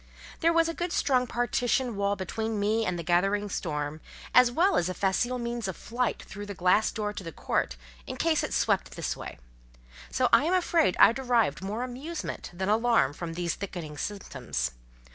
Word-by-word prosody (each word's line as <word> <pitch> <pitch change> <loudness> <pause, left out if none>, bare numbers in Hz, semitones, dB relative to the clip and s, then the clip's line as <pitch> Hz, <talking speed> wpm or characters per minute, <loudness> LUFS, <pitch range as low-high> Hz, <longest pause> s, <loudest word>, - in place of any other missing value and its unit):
There 335 0 +4
was 330 0 +3
a 330 - -2
good 350 +1 -3
strong 255 -6 +2
partition 245 +1 0
wall 200 0 +1
between 220 +3 -3
me 215 +2 +1
and 180 -1 -1
the 170 - -4
gathering 195 +5 +1
storm, 150 -3 -3 0.3
as 250 -1 +7
well 360 +10 +3
as 175 - +1
a 185 - -4
facile 240 +6 +1
means 235 -3 -3
of 190 - -4
flight 240 0 -2
through 205 +1 -8
the 205 - -6
glass 185 +4 +3
door 210 -1 -3
to 195 - -7
the 165 - -6
court, - - -1 0.3
in - - -5
case - - +2
it - - -3
swept 60 -1 +1
this - - -2
way; - - -8 0.7
so 255 - +2
I 290 - +6
am 355 +3 +2
afraid 335 - +2
I - - +9
derived 235 - +1
more 210 +5 -3
amusement 275 +7 -5
than 190 +2 -3
alarm 225 - +3
from 165 +1 -6
these 175 -1 -1
thickening 175 -6 -6
symptoms. 195 - -3
210 Hz, 190 wpm, -28 LUFS, 180-245 Hz, 0.7 s, I